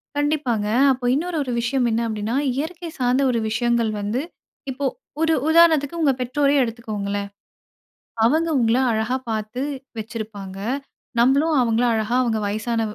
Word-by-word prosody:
கண்டிப்பாங்க. 290 -8 0 0.2
அப்போ 250 -1 -2
இன்னொரு 330 +4 -1
ஒரு 255 - -4
விஷயம் 245 +1 +1
என்ன 225 +1 +1
அப்டின்னா, 215 +2 -2 0.2
இயற்கை 330 +4 -4
சார்ந்த 250 +2 +2
ஒரு 235 - 0
விஷயங்கள் 235 0 +1
வந்து, 215 +6 -1 0.5
இப்போ 275 +2 -4 0.4
ஒரு 325 0 +3 0.2
உதாரணத்துக்கு 330 -1 +4
உங்க 285 -4 +4
பெற்றோரையே 280 +2 +2
எடுத்துக்கோங்களேன். 205 -4 -4 1.0
அவங்க 320 +7 +3
உங்கள 230 +1 +3
அழகா 220 +3 0
பாத்து 220 +3 -3 0.4
வெச்சிருப்பாங்க. 215 -3 -6 0.6
நம்மளும் 280 +6 +3
அவங்கள 235 0 +2
அழகா 220 +1 -1
அவங்க 230 -3 0
வயசான 225 +3 -1
240 Hz, 130 wpm, -22 LUFS, 220-280 Hz, 1.0 s, உதாரணத்துக்கு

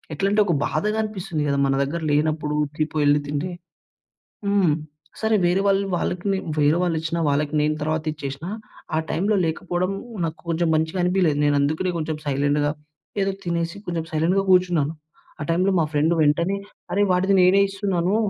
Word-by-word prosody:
ఎట్లంటే, 200 +6 +1
ఒక 175 - +1
బాధగా 210 +1 -1
అనిపిస్తుంది 190 -7 -3
గదా! 140 0 +1
మన 135 - +2
దగ్గర 160 +5 -3
లేనప్పుడు 150 0 0
ఉర్కి 150 +1 -2
పోయి 150 -1 +1
ఎళ్లి 145 0 +4
తింటే. 150 +5 -2 1.0
హ్మ్. 200 -5 +3 0.5
సరే 220 0 +2
వేరే 175 +2 +3
వాళ్ళు 195 0 +2
వాళ్ళకి 175 +1 -2
నే 195 - 0 0.2
వేరే 150 +2 +4
వాళ్ళు 175 -2 +1
ఇచ్చినా 165 +1 -2
వాళ్ళకి 145 +1 0
నేను 150 +1 +2
తరువాత 155 +1 -1
ఇచ్చేసినా. 140 +2 -6 0.5
ఆ - - +3
టైమ్‌లో 205 +5 +1
లేకపోవడం 175 +3 -1 0.3
నాకు 160 0 -4
కొంచెం 170 0 +1
మంచిగనిపియలేదు. 175 0 +1
నేనందుకనే 145 +5 +1
కొంచెం 155 0 -2
సైలెంట్‌‌‌గా 145 +1 +1 0.5
ఏదో 195 - +1
తినేసి 170 0 -2
కొంచెం 170 -2 -2
సైలెంట్‌గా 175 +5 +2
కూర్చున్నాను. 175 -5 +3 0.5
ఆ - - -2
టైమ్‌లో 185 +4 +2
మా 160 - +3
ఫ్రెండ్ 155 +3 +2
వెంటనే 170 +6 +2 0.4
"అరే! 205 +1 +3
వాడిది 190 +2 +3
నేనే 190 +2 +5
ఇస్తున్నానూ" 195 -1 0
165 Hz, 155 wpm, -23 LUFS, 150-185 Hz, 1.0 s, నేనే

